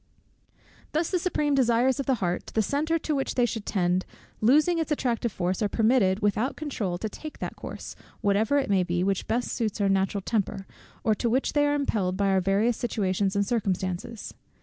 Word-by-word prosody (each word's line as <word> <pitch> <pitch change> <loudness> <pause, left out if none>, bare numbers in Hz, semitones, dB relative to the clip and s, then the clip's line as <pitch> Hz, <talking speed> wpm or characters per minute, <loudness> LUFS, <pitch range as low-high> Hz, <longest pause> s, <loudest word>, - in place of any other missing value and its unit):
Thus 315 +2 0
the 365 - +2
supreme 300 -5 0
desires 255 0 +3
of 275 - -3
the 265 - +3
heart, 180 -5 -2
the 220 - +3
center 305 +8 0
to 310 -1 -2
which 270 -2 -1
they 245 - +3
should 225 -2 -4
tend, 180 -1 +1 0.4
losing 305 +9 +4
its 320 -1 -2
attractive 240 -5 0
force, 185 +1 -2
are 210 - +1
permitted 220 -3 +2
without 210 +6 +1
controul 225 - -3
to 220 - -3
take 305 +8 -9
that - - -5
course, - - -8 0.2
whatever 210 +7 +2
it 275 - +1
may 195 -2 +3
be, 175 0 0
which 195 0 -1
best 240 +2 -1
suits 220 -3 -2
our 200 -1 +2
natural 195 +1 +1
temper, 195 -2 -2 0.4
or 220 - +3
to 235 +3 -1
which 260 +4 +1
they 290 -1 +3
are 290 - +2
impelled 205 -10 0
by 200 -1 +2
our 190 -1 +3
various 200 +5 +2
situations 195 -4 0
and 200 0 +2
circumstances. 195 0 -2
220 Hz, 195 wpm, -27 LUFS, 195-265 Hz, 0.4 s, losing